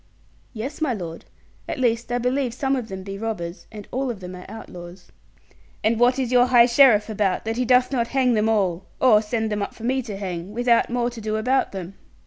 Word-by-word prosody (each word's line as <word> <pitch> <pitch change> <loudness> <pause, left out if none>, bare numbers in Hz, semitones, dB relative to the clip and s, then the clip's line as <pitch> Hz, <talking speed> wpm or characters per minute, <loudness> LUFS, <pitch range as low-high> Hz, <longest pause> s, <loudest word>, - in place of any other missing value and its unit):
'Yes, 260 +7 -6
my 275 -6 +1
lord. 170 -4 -7 0.4
At - - -3
least, 240 -2 0
I 245 - +1
believe 250 0 -1
some 270 0 0
of 250 -4 -4
them 190 -2 -7
be 195 0 -7
robbers, 195 -6 -5
and 210 -2 -10
all 260 +1 -1
of 230 -5 -5
them 180 -1 -8
are 180 - -11
outlaws.' 180 -4 -11 0.7
'And 220 +1 +2
what 245 +2 +4
is 255 -2 -1
your 250 0 +5
high 240 -2 +6
sheriff 240 -4 +5
about, 205 -3 -1
that 225 +1 -2
he 250 - 0
doth 250 +1 +4
not 235 -4 0
hang 255 -1 +2
them 215 0 +2
all? 190 -4 0
Or 220 -5 +5
send 220 0 -2
them 210 0 -1
up 200 - -4
for 225 - -12
me 260 +2 +1
to 210 -5 -7
hang, 185 -1 -5
without 240 0 +2
more 240 0 0
to 235 -2 -9
do 215 0 -2
about 250 +5 +1
them?' 190 -1 -7
225 Hz, 225 wpm, -23 LUFS, 200-250 Hz, 0.7 s, high